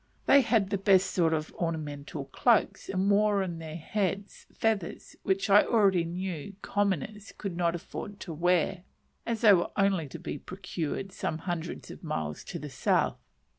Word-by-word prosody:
They 280 - +7
had 220 -5 +2
the 200 - 0
best 190 -1 +4
sort 170 -4 +2
of 155 -1 -2
ornamented 150 -4 -4
cloaks, 215 - +2
and 190 +1 0
wore 205 -1 +3
in 170 -3 -4
their 160 -1 -7
heads, 195 +3 -3
feathers, 220 -6 -2
which 195 +1 0
I 205 +1 +7
already 195 -7 +3
knew 180 +1 -5
"commoners" 205 +1 -1
could 195 -4 -4
not 170 -1 +1
afford 200 +4 -7
to 170 - -5
wear, 175 +2 +1 0.5
as 230 -2 -1
they 215 -3 +8
were 175 -2 +2
only 195 -6 +2
to - - -8
be 145 - -5
procured 185 +1 -4
some 155 - -3
hundreds 170 0 -5
of - - -12
miles 80 - -3
to - - -5
the - - -6
south. - - +1
185 Hz, 170 wpm, -29 LUFS, 165-200 Hz, 0.5 s, they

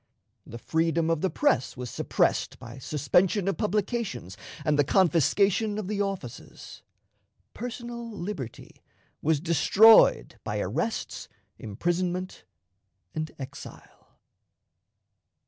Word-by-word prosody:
The 115 - -8
freedom 165 +4 0
of 165 -2 0
the 190 - +1
press 285 - +1
was 125 -3 -6
suppressed - - 0
by 115 +3 -10
suspension 175 - +1
of 195 - 0
publications 210 - -2 0.3
and 150 -2 +2
the - - +6
confiscation 195 - +2
of 215 -3 -4
the 205 0 -1
offices. 190 -12 -6 0.7
Personal 235 0 -6
liberty 175 - -7 0.4
was 155 -1 +2
destroyed 190 +7 +5
by - - -3
arrests, - - -3 0.3
imprisonment, 175 - -3 0.7
and 155 0 -3
exile. 135 -2 -11
175 Hz, 100 wpm, -27 LUFS, 145-205 Hz, 0.7 s, the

